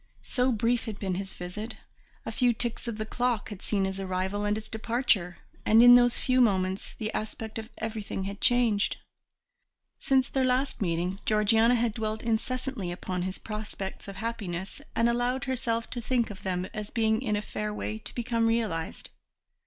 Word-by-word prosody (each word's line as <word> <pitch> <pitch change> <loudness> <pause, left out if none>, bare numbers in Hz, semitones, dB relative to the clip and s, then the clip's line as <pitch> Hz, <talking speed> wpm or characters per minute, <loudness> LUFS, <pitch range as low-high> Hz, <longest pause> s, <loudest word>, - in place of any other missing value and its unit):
So 255 0 +1
brief 230 +1 +1
had 215 -3 -5
been 190 -2 -2
his 190 +1 -4
visit 210 +6 -5 0.5
a - - -3
few 245 -2 +3
ticks 235 +1 -3
of 230 -2 -3
the 215 - -2
clock 240 -1 0
had 205 -3 -8
seen 200 -2 0
his 190 0 -3
arrival 190 +2 -1
and 205 +1 +1
his 215 0 -7
departure; 220 -6 +1 0.3
and 225 +2 +6
in 245 0 +10
those 245 -1 +6
few 255 0 +3
moments 190 -4 +1
the 215 -1 -3
aspect 220 +1 -4
of 220 +1 -8
everything 215 -3 -3
had 200 +1 -5
changed. 235 -5 +3 1.0
Since 265 -2 +2
their 265 - +1
last 255 +1 +1
meeting 180 +1 0
Georgiana 220 +3 +4
had 235 -2 +1
dwelt 220 -1 -3
incessantly 235 -3 -1
upon 180 +1 -3
his 185 +1 -3
prospects 210 -3 -6
of 195 - -7
happiness, 195 -4 -4
and 230 - +4
allowed 245 +2 +1
herself 235 -3 -1
to 240 - -3
think 235 -1 +1
of 195 - -10
them 180 -1 -1
as 210 -1 -5
being 220 0 +2
in 215 -5 0
a 205 - 0
fair 210 0 -3
way 215 +1 -4
to - - -7
become 230 -1 +1
realized. 215 -8 -1
220 Hz, 180 wpm, -28 LUFS, 195-240 Hz, 1.0 s, in